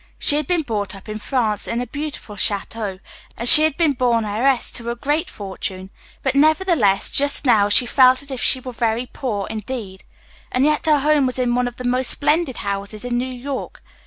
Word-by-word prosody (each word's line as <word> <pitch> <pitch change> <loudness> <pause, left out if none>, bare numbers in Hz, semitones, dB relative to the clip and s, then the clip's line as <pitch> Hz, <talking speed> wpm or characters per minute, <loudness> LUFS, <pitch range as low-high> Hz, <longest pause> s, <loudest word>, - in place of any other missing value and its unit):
She 290 - +3
had 300 -2 -2
been 350 -3 0
born 210 -6 -3 0.2
in 215 0 -7
France, 220 -4 -1
in 230 - -3
a 245 - -3
beautiful 285 -4 -7
château, 200 0 -1 0.4
and 235 - -2
she 300 - +11
had 310 -2 +1
been 330 -3 +2
born 240 -3 0
heiress 240 +5 +1
to 235 0 -3
a 235 - -3
great 290 +5 -2
fortune, 190 -1 -7 0.3
but, 265 - 0
nevertheless, 300 - +2
just 285 +1 +4
now 215 -5 +3
she 205 +4 +4
felt 255 +2 +3
as 280 - -4
if 260 - -5
she 260 - +2
was 255 -1 -9
very 230 +1 -1
poor, 230 -6 -5
indeed. 215 -3 -7 0.5
And 255 +2 +1
yet 300 +1 0
her 300 -2 +3
home 295 -2 +2
was 255 - -2
in 245 -1 0
one 250 0 0
of 245 - -8
the 250 - -9
most 250 +1 +1
splendid 300 -3 +1
houses 200 +3 -5
in 245 -1 -3
New 250 - -2
York. 260 +2 -7
245 Hz, 205 wpm, -19 LUFS, 215-280 Hz, 0.5 s, she